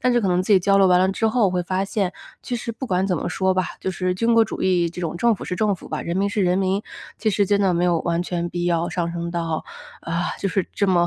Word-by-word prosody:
但 255 0 +2
是 240 - +3
可 200 - 0
能 180 0 +2
自 210 - +1
己 195 - +7
交 195 +2 +3
流 195 - +5
完 180 0 +5
了 185 - +3
之 220 +3 0
后， 220 -3 +3
会 180 -1 -1
发 185 +2 -1
现， 195 -3 -1 0.3
其 245 - -3
实 230 0 -5
不 245 +4 -6
管 185 +1 +1
怎 180 - 0
么 170 - -3
说 190 +1 +1
吧， 185 - +2 0.2
就 - - -4
是 185 0 -1
军 230 +4 +2
国 230 - +6
主 220 - -6
义， 180 -2 +2
这 170 +2 -8
种 170 -1 -3
政 235 +6 +3
府 - - -8
是 180 - -3
政 205 -1 +1
府 - - -13
吧， - - -3
人 170 +1 -3
民 200 +1 +1
是 205 -1 0
人 180 +1 +2
民。 195 +2 0 0.4
其 215 0 +1
实 200 0 +1
真 205 0 +2
的 190 -2 +3
没 175 +1 +1
有 170 -2 +2
完 170 0 0
全 175 -1 -2
必 175 0 -3
要 170 -1 +1
上 170 -2 -2
升 170 0 -4
到 165 -2 -2 0.4
啊， 170 +1 -2
就 195 - 0
是 190 -1 -1
这 200 - +1
么， 175 -2 +3
185 Hz, 325 characters per minute, -22 LUFS, 175-200 Hz, 0.4 s, 己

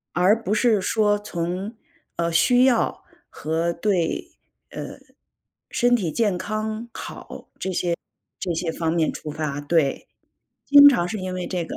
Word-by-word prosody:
而 200 +6 +3
不 205 - -1
是 220 -1 +3
说 205 +2 +2
从， 185 +2 -4 0.4
呃， 170 0 0
需 245 +9 +4
要 245 -3 +1 0.3
和 165 +2 -2
对， 175 -2 -1 0.4
呃， - - -7 0.7
身 245 0 +3
体 185 -9 -1
健 210 -3 0
康 215 +3 -4
好， - - -9
这 190 - -3
些 175 -1 -1 0.4
这 180 -3 -2
些 165 0 -2
方 160 0 -1
面 165 -2 +1
出 150 - -7
发。 150 -2 -3
对， 145 -1 0 0.6
经 285 0 +9
常 175 -12 +4
是 215 - -4
因 185 -1 -4
为 185 -1 -4
这 180 -3 -3
个 - - -7
185 Hz, 165 characters per minute, -23 LUFS, 170-215 Hz, 0.7 s, 经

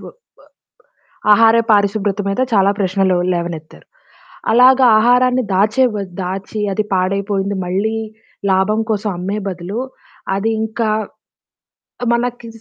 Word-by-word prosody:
బ్ - - -10 1.2
ఆహార 225 +2 +5
పారిశుభ్రత 205 -1 +1
మీద 195 - -2
చాలా 200 -2 +4
ప్రశ్నలు 190 -1 +1 0.2
లేవనెత్తారు. 170 -3 -6 0.7
అలాగా 255 +2 +6
ఆహారాన్ని 250 +2 +3
దాచేవ 215 +5 +2 0.3
దాచి 195 +4 -5
అది 215 +2 -1
పాడైపోయింది 195 +1 -1
మళ్ళీ 200 +5 -1 0.5
లాభం 190 +3 +2
కోసం 210 0 -2
అమ్మే 195 +4 -3
బదులు, 185 +4 -5 0.6
అదింకా 220 +1 -1 1.1
ఆ! - - 0
మనకి 240 0 -2
205 Hz, 100 wpm, -17 LUFS, 190-225 Hz, 1.2 s, అలాగా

